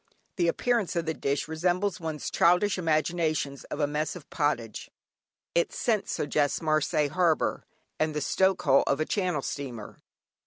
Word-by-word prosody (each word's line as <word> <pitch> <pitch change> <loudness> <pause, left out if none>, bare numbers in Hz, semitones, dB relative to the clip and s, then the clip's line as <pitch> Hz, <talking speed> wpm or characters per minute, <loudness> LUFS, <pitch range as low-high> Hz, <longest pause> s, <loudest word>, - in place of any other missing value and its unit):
The 175 -2 +2
appearance 230 +2 0
of 170 -1 0
the 160 - -1
dish 140 -1 -1
resembles 175 +4 0
one's 160 -3 -4
childish 180 +3 +3
imaginations 155 -3 0
of - - -6
a 145 - +3
"Mess 150 +3 -2
of 170 -5 -11
Pottage." 130 -8 -1 0.6
Its 170 - +1
scent 220 -4 0
suggests 145 -1 0
Marseilles 155 -2 +1
harbour, 175 -4 +1 0.3
and 155 -1 0
the - - 0
stoke 190 +6 +2
hole 135 -1 +5
of 140 - +1
a 155 - +1
Channel 180 -8 -1
steamer. 125 -7 -6
155 Hz, 155 wpm, -28 LUFS, 145-180 Hz, 0.6 s, hole